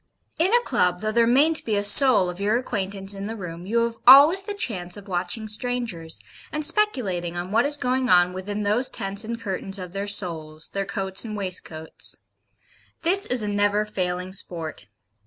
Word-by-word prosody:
In 355 +5 +2
a 480 - +5
Club, 180 - 0
though 215 0 -1
there 230 +1 +2
mayn't 295 +6 +2
be 220 - -1
a 205 - 0
soul 210 -2 +7
of 180 +1 -7
your 210 +3 +1
acquaintance 200 -5 -4
in 200 0 -6
the 225 - -5
room, 175 -3 -8
you 230 +3 +1
have 230 0 -3
always 290 +9 +9
the 405 +1 -6
chance 185 - -3
of 205 - -12
watching 185 +4 -2
strangers, 215 -7 -3 0.3
and 305 0 -3
speculating 210 - -1
on 175 +2 -5
what 230 +5 +2
is 290 0 +2
going 255 -1 -1
on 180 -1 +4
within 205 +3 -5
those 215 +6 +1
tents 195 +2 -3
and 230 +1 -5
curtains 195 -2 -3
of 180 -2 -8
their 200 +2 -5
souls, 160 -6 +1
their 195 0 -3
coats 190 -2 -4
and 215 -2 -6
waistcoats. 175 -5 -6 0.9
This 385 +4 +4
is 250 -3 -1
a - - -3
never 205 +1 +1
failing 180 -2 -4
sport. 165 - -3
205 Hz, 190 wpm, -23 LUFS, 180-240 Hz, 0.9 s, always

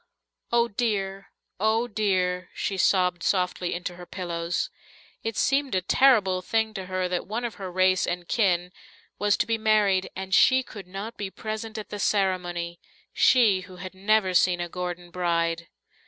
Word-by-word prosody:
"Oh, 235 0 +3
dear! 195 -4 -2 0.3
oh, 220 +3 +2
dear!" 185 -5 0
she 195 - -2
sobbed 180 -1 +2
softly 180 -2 0
into 175 0 -5
her 180 -1 -10
pillows. 170 -2 -3 0.5
It 225 -1 -4
seemed 275 -4 +1
a 185 - +2
terrible 205 -6 +4
thing 220 +3 0
to 190 -3 -6
her 185 0 -1
that 180 -1 -3
one 230 +4 -3
of 235 - -3
her 185 -1 -5
race 185 0 +3
and 175 0 -3
kin 180 -5 +1 0.5
was 205 0 +2
to - - +1
be 225 -1 -1
married 210 -3 +3
and 190 0 -5
she 260 +6 +5
could 200 -6 -10
not 200 +5 -7
be 200 -2 -4
present 220 +2 -6
at 215 - -6
the 205 - -6
ceremony, 175 -4 0 0.3
she 220 -7 +4
who 185 - -12
had 185 +1 -8
never 195 0 +2
seen 180 0 +3
a 175 - -2
Gordon 175 0 -5
bride. 170 -1 0
190 Hz, 170 wpm, -26 LUFS, 180-215 Hz, 0.5 s, she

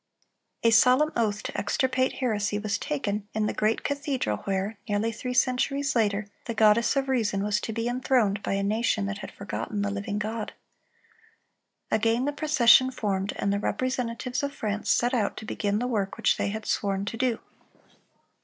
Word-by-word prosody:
A 230 - +5
solemn 255 +7 +5
oath 210 -3 0
to - - -6
extirpate 260 +5 +1
heresy 210 -5 -1
was 210 -1 -2
taken 215 -9 -2
in 215 -1 +1
the - - -1
great 215 +1 0
cathedral 280 - -1
where, 195 +2 -2
nearly 205 +2 +1
three 250 +3 -5
centuries 275 +2 +1
later, 210 -3 +1 0.2
the 230 - -4
"Goddess 220 +3 +4
of 275 -1 0
Reason" 220 -7 0
was 210 0 0
to - - -4
be 230 +1 -2
enthroned 245 -5 +1
by - - -2
a 200 0 0
nation 215 0 +1
that 200 +1 -4
had 195 - -8
forgotten 200 0 -4
the 200 - -1
living 205 +1 -3
God. 215 +1 -3 1.4
Again 230 +3 +2
the 290 - -1
procession 260 -4 +5
formed, 200 -5 -2
and 200 - 0
the 200 - 0
representatives 250 +2 -2
of 280 0 -3
France 210 -3 -3
set 245 +2 +2
out 215 -5 0
to 220 - -7
begin 205 -1 -1
the 240 - -1
work 210 -6 -1
which - - +2
they - - -1
had 215 +1 -5
sworn 195 -1 -1
to 205 - -4
do. 245 -1 0
220 Hz, 180 wpm, -27 LUFS, 205-255 Hz, 1.4 s, A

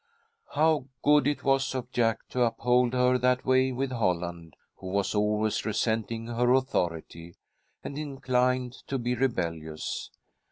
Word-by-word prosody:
How 155 -3 +3 0.2
good 145 -2 +5
it 145 - -1
was 135 -1 +1
of 125 -1 -4
Jack 115 -3 0
to 125 - -2
uphold 125 +1 +2
her 125 0 +3
that 125 +1 +1
way 130 0 +3
with 130 +1 -2
Holland, 85 - -2 0.2
who 95 - -9
was 100 +1 0
always 105 +1 +1
resenting 115 +1 -1
her 120 +1 +1
authority, 85 -9 -2 0.5
and 140 - -6
inclined 130 -3 0
to 135 - -1
be 120 0 -1
rebellious. 85 -11 -2
125 Hz, 135 wpm, -28 LUFS, 105-130 Hz, 0.5 s, good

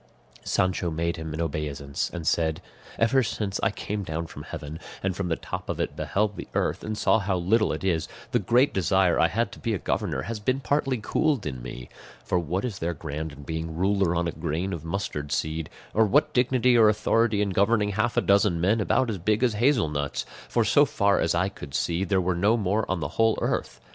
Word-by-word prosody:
Sancho 90 -1 0
made 85 +1 -1
him 80 -1 -5
an 80 - -5
obeisance, 70 -3 -2
and 85 -2 -6
said, 80 0 +1 0.4
"Ever 115 +4 +3
since 105 -4 -2
I 115 - +3
came 105 0 -4
down 80 -1 -3
from 75 - -9
heaven, 75 +1 -7 0.2
and 95 -1 0
from 95 -1 -2
the 85 - +1
top - - -6
of - - -3
it - - -2
beheld 105 0 0
the - - -6
earth, - - 0
and 110 0 -3
saw 110 - +3
how 95 -2 0
little 110 +6 +2
it - - -4
is, 85 -4 0 0.2
the 120 - +3
great 120 +7 +3
desire 95 -1 +2
I 85 - +5
had 115 +6 -1
to - - -11
be 115 -2 -1
a - - -1
governor - - -2
has 110 +4 -4
been 130 +5 0
partly 135 -1 0
cooled 120 - 0
in 65 -4 -4
me; 65 0 -8 0.4
for 90 - +1
what 90 +6 -2
is 110 -6 -4
there 85 +1 -2
grand 75 +1 -5
in 70 0 -12
being 80 +1 -4
ruler 95 -1 +2
on 85 +1 0
a - - -1
grain 85 +6 -3
of 85 - -5
mustard 80 -5 -4
seed, 80 0 -2 0.2
or 110 0 +4
what 150 +6 +3
dignity 125 0 +3
or 110 -2 +7
authority 105 +1 +2
in 100 -1 +1
governing 105 +2 +2
half 110 +4 0
a - - +5
dozen 100 -3 +3
men 100 +6 +2
about 130 +5 +2
as 100 - -4
big 110 +6 +1
as 120 -3 +3
hazel 120 - +3
nuts; 70 -1 -3 0.2
for, - - +2
so - - +5
far 100 0 +2
as 80 - +1
I 95 +3 +2
could 75 -7 -8
see, 85 +2 0
there 95 0 +1
were 90 0 +1
no 100 +7 +3
more 105 +1 0
on 95 -3 -1
the 70 - -1
whole 110 +8 +2
earth? - - -2
95 Hz, 225 wpm, -26 LUFS, 80-110 Hz, 0.4 s, or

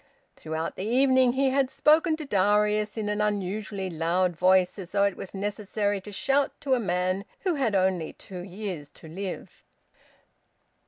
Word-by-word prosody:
Throughout 160 +1 -4
the 185 - -4
evening 260 0 +4
he 265 0 +2
had 270 -1 +2
spoken 315 +3 +3
to 310 -1 -7
Darius 210 0 +2
in 215 -1 -2
an 210 0 -1
unusually 205 -1 -2
loud 175 +1 0
voice, 185 +2 +3
as 185 -2 -9
though 200 0 +3
it 200 -2 +1
was 195 - -8
necessary 205 0 -2
to 210 - -10
shout 275 +7 +1
to 275 -2 +1
a 255 - +3
man 185 -1 0 0.2
who 370 -3 +1
had 260 -9 0
only 185 -4 +1
two 185 -2 -10
years 180 -5 -6
to 160 - -14
live. 185 +3 -7
200 Hz, 165 wpm, -27 LUFS, 185-230 Hz, 0.2 s, evening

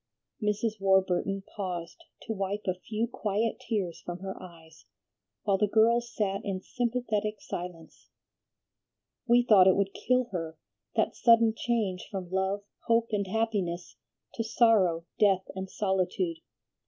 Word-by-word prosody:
Mrs. 210 0 -1
Warburton 190 0 +2
paused 180 -4 -5 0.2
to 220 - -3
wipe 200 +1 -3
a 185 - +1
few 215 +5 -3
quiet 220 0 -1
tears 210 -9 -3
from 175 0 -5
her 190 0 -4
eyes, 160 - -14 0.6
while 195 -1 +2
the 210 - +3
girls 235 +3 +3
sat 195 -2 -1
in 195 -2 -2
sympathetic 220 -2 -2
silence. 175 -2 -8 1.2
"We 240 0 +5
thought 190 -4 +7
it 190 - +6
would 195 0 0
kill 250 0 +1
her, 165 -3 -4 0.4
that - - +1
sudden 230 -1 +5
change 215 -7 -1
from 185 -3 -6
love, 190 +2 0 0.2
hope, 230 0 +3
and 200 -2 0
happiness 195 -5 -2 0.4
to 230 - -2
sorrow, 220 -8 +3
death, 195 -3 +4
and 190 0 -5
solitude. 185 -4 -1
200 Hz, 135 wpm, -29 LUFS, 185-225 Hz, 1.2 s, thought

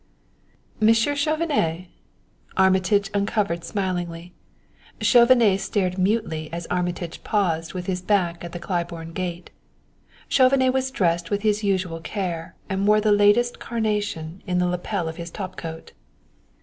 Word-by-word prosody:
"Monsieur 225 +6 +3
Chauvenet!" 285 - 0 0.7
Armitage 190 +2 +3
uncovered 200 -4 0
smilingly. 175 -2 -3 0.7
Chauvenet 235 -5 +5
stared 190 -2 -1
mutely 185 -6 0
as 170 0 -5
Armitage 175 -1 -3
paused 170 -5 0
with 180 -1 -4
his 180 -1 -2
back 180 -3 +1
to 175 - -7
the 175 - -7
Claiborne 170 -2 -4
gate. 175 -1 -5 0.8
Chauvenet 260 -1 +4
was 265 0 0
dressed 170 -8 0
with 205 0 -1
his 215 0 +1
usual 185 -4 0
care, 170 -3 -4
and 195 0 -1
wore 210 0 +5
the 210 0 +2
latest 205 +4 +4
carnation 205 -7 -2
in 180 -1 0
the 180 - +2
lapel 180 0 -2
of 160 - -6
his 170 -1 -6
top 185 0 -6
coat. 160 -2 -8
190 Hz, 135 wpm, -23 LUFS, 170-210 Hz, 0.8 s, Chauvenet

